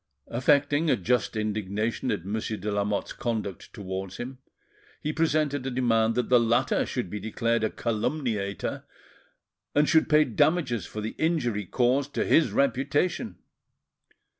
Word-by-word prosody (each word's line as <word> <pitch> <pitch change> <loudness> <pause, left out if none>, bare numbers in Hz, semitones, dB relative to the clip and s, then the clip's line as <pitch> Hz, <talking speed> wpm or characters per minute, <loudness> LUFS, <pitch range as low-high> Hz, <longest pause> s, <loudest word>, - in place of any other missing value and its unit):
Affecting 145 +4 +2
a - - +5
just 120 +4 0
indignation 105 +1 -2
at 95 -5 -2
Monsieur 110 +2 -3
de 105 +2 -3
Lamotte's 100 0 -1
conduct 110 -6 -4
towards 95 -1 -6
him, 130 +1 -6 0.6
he 155 0 -3
presented 150 -4 +1
a 135 - -2
demand 115 -3 +2
that 125 - 0
the 125 -1 +5
latter 120 +2 +2
should 125 -5 -3
be 105 +4 -5
declared 115 +2 -1
a 110 - +2
calumniator, 110 -3 -2 0.9
and 145 +1 +4
should 160 -2 +3
pay 155 0 +6
damages 125 - +1
for 105 - -6
the 110 - -4
injury 120 - 0
caused 130 +5 +1
to - - +1
his 160 - +4
reputation. 140 - 0
120 Hz, 140 wpm, -27 LUFS, 105-145 Hz, 0.9 s, pay